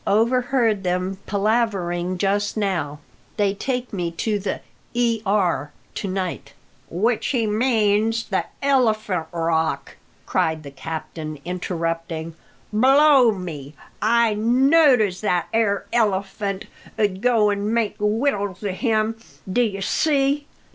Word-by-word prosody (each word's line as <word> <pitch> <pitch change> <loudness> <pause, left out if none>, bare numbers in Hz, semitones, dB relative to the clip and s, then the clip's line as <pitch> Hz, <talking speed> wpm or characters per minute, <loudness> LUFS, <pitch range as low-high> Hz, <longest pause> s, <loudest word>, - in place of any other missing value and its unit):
Overheard 235 0 +2
them 185 +1 -2
palavering 195 -4 0
just 205 +3 0
now. 175 -8 -1 0.4
They 200 -2 +2
take 250 +3 -3
me 175 -3 -1
to 210 +4 -1
the 190 -1 -3 0.3
E. 235 -2 +1
R. 175 -8 +1 0.2
to 200 - -4
night 185 -7 -4 0.2
'" 130 - -35
"Which 220 +7 0
he 240 -5 +1
means 220 0 +2
the - - -1 0.2
Elephant 215 -10 +1
Rock!" 160 -4 -1 0.3
cried 160 -1 0
the 140 - -9
captain, 155 +2 -6
interrupting. 165 -2 -3 0.4
"Blow 265 +2 +6
me! 155 -7 -7 0.3
I 230 +1 +3
knowed 260 +5 +4
as 190 -3 -1
that 180 -5 0
'ere 220 -3 +1
Elephant 200 -2 0 0.3
'ud 200 -3 0
go 225 -4 +3
an' 205 +1 -1
make 225 -3 0
wittles 210 -3 0
of 190 -2 -3
him, 225 -2 0 0.3
d'ye 215 -4 +1
see?" 285 +4 +1
205 Hz, 120 wpm, -22 LUFS, 180-230 Hz, 0.4 s, Blow